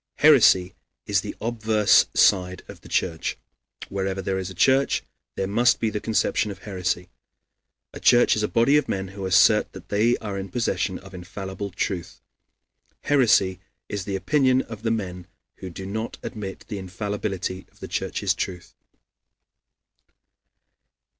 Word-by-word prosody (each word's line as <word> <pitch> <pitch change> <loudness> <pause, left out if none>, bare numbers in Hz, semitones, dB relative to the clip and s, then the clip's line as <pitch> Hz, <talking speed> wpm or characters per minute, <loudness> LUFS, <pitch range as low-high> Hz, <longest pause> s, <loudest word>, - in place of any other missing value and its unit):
Heresy 115 -11 +5 0.3
is - - +1
the - - -6
obverse 110 -2 +3
side 90 -1 +3
of - - -12
the - - -14
Church. 80 -3 -1 0.5
Wherever 95 0 -3
there 95 0 -2
is 95 -1 -4
a 95 - -10
church, 135 +9 +3 0.3
there 95 - -1
must 120 +5 +3
be 110 -2 0
the 105 - -2
conception 110 0 0
of 100 - -9
heresy. 90 -3 -2 0.8
A - - -8
church 120 0 +5
is 105 - -1
a 105 - +1
body 120 +7 +3
of 150 - 0
men 95 -1 -2
who 95 0 -5
assert 105 +3 +4
that 95 -1 -12
they 110 +4 +2
are 100 -3 -5
in 95 0 -6
possession 100 -3 -1
of 95 0 -14
infallible 95 +2 -6
truth. 90 -1 -4 0.8
Heresy 105 -10 +3 0.3
is 100 -3 -4
the 100 - -3
opinion 130 +6 +2
of 110 -2 -9
the 115 - -1
men 90 -5 -3 0.3
who 95 - -7
do 95 +2 -8
not 110 +4 -4
admit 100 -5 -6
the 105 -3 -5
infallibility 95 -1 -4
of - - -26
the - - -7
Church's - - -1
truth. 90 -2 -5
100 Hz, 155 wpm, -24 LUFS, 95-110 Hz, 0.8 s, Heresy